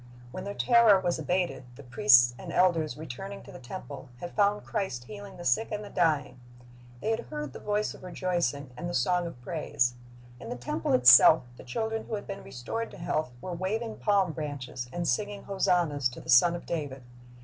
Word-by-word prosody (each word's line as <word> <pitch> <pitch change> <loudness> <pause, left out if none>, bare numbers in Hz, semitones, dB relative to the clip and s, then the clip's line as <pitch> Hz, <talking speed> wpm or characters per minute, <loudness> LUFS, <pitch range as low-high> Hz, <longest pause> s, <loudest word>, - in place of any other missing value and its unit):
When - - -6
their 200 0 -5
terror 235 -5 +5
was 175 -3 -1
abated, 160 -4 -1
the 145 - -12
priests 125 -1 +5
and 175 - -7
elders, 165 -7 +2
returning 160 +7 -7
to - - -12
the - - -10
temple, 135 0 -9
had 175 - -6
found 205 0 +2
Christ 190 - -3
healing 200 +7 -10
the 175 - -9
sick 175 - +1
and 210 0 -3
the 205 - -10
dying. 155 -7 0 0.6
They 220 - 0
had 225 - -2
heard 150 -3 -5
the - - -8
voice 210 0 -1
of - - -14
rejoicing 175 -7 -2
and 175 +8 -5
the 175 - -3
song 175 +7 +1
of 145 -7 -10
praise. 145 -6 0 0.5
In - - -9
the - - -3
temple 120 -1 -2
itself 125 0 +8
the - - -12
children 220 - -3
who 220 - -3
had 205 - -6
been 195 0 -6
restored 180 - -5
to - - -12
health 155 -4 -2
were 180 - -5
waving 215 +6 -3
palm 200 -4 +2
branches 140 -5 -6
and 175 +2 -3
singing 205 +10 -1
hosannas 170 -8 +1
to 120 - -10
the - - -13
Son 170 +8 +6
of 170 - -8
David. 145 -6 -4
170 Hz, 200 wpm, -28 LUFS, 130-200 Hz, 0.6 s, itself